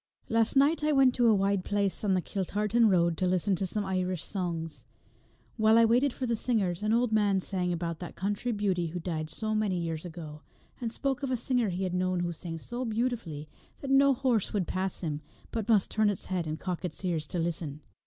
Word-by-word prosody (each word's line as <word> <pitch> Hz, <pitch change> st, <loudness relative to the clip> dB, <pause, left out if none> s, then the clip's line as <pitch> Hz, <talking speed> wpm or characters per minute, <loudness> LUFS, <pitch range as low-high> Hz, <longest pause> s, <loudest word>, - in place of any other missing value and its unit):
Last 225 Hz, +1 st, +2 dB
night 290 Hz, +3 st, +4 dB
I 305 Hz, -, +3 dB
went 270 Hz, -3 st, +5 dB
to 245 Hz, -2 st, +3 dB
a 220 Hz, -, +6 dB
wide 195 Hz, -1 st, +1 dB
place 200 Hz, 0 st, 0 dB
on 195 Hz, -3 st, +2 dB
the 180 Hz, -, 0 dB
Kiltartan 210 Hz, +4 st, +1 dB
road 170 Hz, -3 st, +3 dB
to 185 Hz, -, +1 dB
listen 185 Hz, +2 st, +1 dB
to 190 Hz, -, -1 dB
some 205 Hz, +2 st, -2 dB
Irish 185 Hz, -2 st, -1 dB
songs. 170 Hz, -5 st, -4 dB, 0.7 s
While 220 Hz, 0 st, +5 dB
I 230 Hz, -, +7 dB
waited 245 Hz, +5 st, +3 dB
for 255 Hz, -, -4 dB
the 235 Hz, -1 st, +1 dB
singers 210 Hz, -7 st, 0 dB
an 215 Hz, 0 st, 0 dB
old 235 Hz, 0 st, +2 dB
man 205 Hz, -3 st, +3 dB
sang 180 Hz, -1 st, -2 dB
about 170 Hz, -1 st, -3 dB
that 175 Hz, -, -7 dB
country 205 Hz, +5 st, -2 dB
beauty 195 Hz, -5 st, 0 dB
who 175 Hz, +2 st, -5 dB
died 160 Hz, -3 st, -3 dB
so 215 Hz, +5 st, -3 dB
many 210 Hz, -4 st, +1 dB
years 165 Hz, -2 st, -3 dB
ago, 160 Hz, -3 st, -8 dB, 0.4 s
and 235 Hz, -2 st, -3 dB
spoke 275 Hz, +2 st, -1 dB
of 275 Hz, -, -2 dB
a 255 Hz, -, +1 dB
singer 240 Hz, -2 st, +1 dB
he 185 Hz, +1 st, -2 dB
had 185 Hz, -1 st, -2 dB
known 185 Hz, 0 st, 0 dB
who 175 Hz, -1 st, -1 dB
sang 165 Hz, 0 st, -6 dB
so 240 Hz, +9 st, -5 dB
beautifully 225 Hz, -10 st, -2 dB, 0.3 s
that 275 Hz, -, -3 dB
no 275 Hz, 0 st, +5 dB
horse 240 Hz, -5 st, 0 dB
would 200 Hz, -4 st, +1 dB
pass 185 Hz, +1 st, -2 dB
him, 155 Hz, -4 st, -3 dB, 0.3 s
but 225 Hz, -1 st, -3 dB
must 210 Hz, -4 st, +4 dB
turn 215 Hz, -1 st, +3 dB
its 200 Hz, -, -3 dB
head 180 Hz, -3 st, -2 dB
and 155 Hz, +1 st, -3 dB
cock 180 Hz, -2 st, -4 dB
its 180 Hz, +1 st, -4 dB
ears 160 Hz, -4 st, -1 dB
to 180 Hz, -, -4 dB
listen. 165 Hz, -3 st, -3 dB
195 Hz, 225 wpm, -29 LUFS, 175-230 Hz, 0.7 s, I